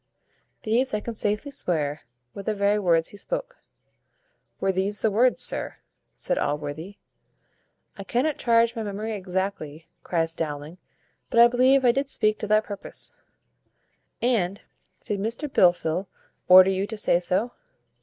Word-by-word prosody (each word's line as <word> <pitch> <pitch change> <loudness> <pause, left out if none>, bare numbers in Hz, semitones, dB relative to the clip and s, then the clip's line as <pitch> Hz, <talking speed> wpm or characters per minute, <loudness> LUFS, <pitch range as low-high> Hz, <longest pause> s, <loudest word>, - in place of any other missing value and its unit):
These, 235 +2 +1
I - - 0
can 235 +2 -6
safely 210 +6 -2
swear, 155 - -2 0.3
were 200 - -7
the 215 +2 -2
very 200 +1 +2
words 170 -4 +2
he 205 - -12
spoke." - - -5 1.0
"Were 195 - +1
these 195 +2 -2
the 220 - +3
words, 240 +5 +2
sir?" - - -1 0.4
said - - -2
Allworthy. 150 +6 -4 1.0
"I - - -5
cannot 265 +9 -1
charge 230 0 +3
my 225 - -3
memory 215 +1 -4
exactly," 185 -5 -4
cries 165 -2 -1
Dowling, 155 +1 -5 0.5
"but 235 - +2
I 235 - +9
believe 255 +2 +3
I 240 - +6
did 275 +2 -2
speak 215 -5 +1
to 210 - -4
that 215 +1 +3
purpose." 205 -2 -6 1.1
"And 200 -6 0 0.4
did 205 -3 -3
Mr 230 +8 -2
Blifil 180 - +2 0.4
order 185 +1 +8
you 190 +1 -1
to 220 - -6
say 175 -4 +2
so?" 185 +7 -1
205 Hz, 145 wpm, -25 LUFS, 180-235 Hz, 1.1 s, I